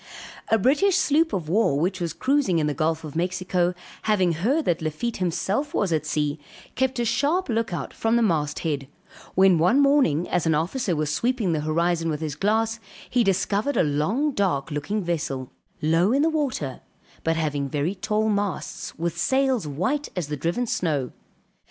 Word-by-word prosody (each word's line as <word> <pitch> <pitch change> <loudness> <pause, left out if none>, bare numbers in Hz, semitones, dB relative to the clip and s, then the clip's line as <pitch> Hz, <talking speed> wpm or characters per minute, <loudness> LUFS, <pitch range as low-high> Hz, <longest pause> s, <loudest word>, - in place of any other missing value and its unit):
A 225 - +3
British 295 - +3
sloop 320 -3 +3
of 175 -5 -3
war 170 -5 +2
which 180 +3 -1
was 170 -2 -1
cruising 260 - +1
in 155 - +1
the 150 - 0
Gulf 160 +3 -1
of 155 -2 -8
Mexico, 180 0 0 0.3
having 190 -5 +2
heard 240 - 0
that 170 -1 +1
Lafitte 160 +10 -3
himself 190 - -1
was 190 -5 +1
at 155 -1 -1
sea, 150 -1 -1 0.3
kept 260 0 0
a 240 - 0
sharp 290 +11 +1
look 230 -2 0
out 155 -6 -4
from 225 +1 0
the 235 - +3
mast 155 -7 0
head; 145 -5 -2 0.5
when 190 -2 +5
one 205 - +4
morning 275 - +3
as 175 -2 0
an 160 - +3
officer 180 - -1
was 150 0 -1
sweeping 235 -4 0
the 155 - 0
horizon 165 +2 0
with 150 -2 -2
his 155 -2 -3
glass 220 +7 0 0.3
he 245 -1 +3
discovered 200 +6 0
a - - +4
long 170 - 0
dark 175 - 0
looking 170 +9 -2
vessel, 155 -7 -3 0.3
low 165 +6 +3
in 275 +3 +3
the 325 - +3
water, 255 - -2 0.4
but 165 0 +1
having 145 -3 -1
very 150 +6 -1
tall 215 +2 -1
masts, 205 -2 -2
with 170 +1 -2
sails 265 - +1
white 185 - -1
as 175 -6 -3
the 150 - -2
driven 170 - -1
snow. 150 - -1
180 Hz, 180 wpm, -24 LUFS, 155-230 Hz, 0.5 s, when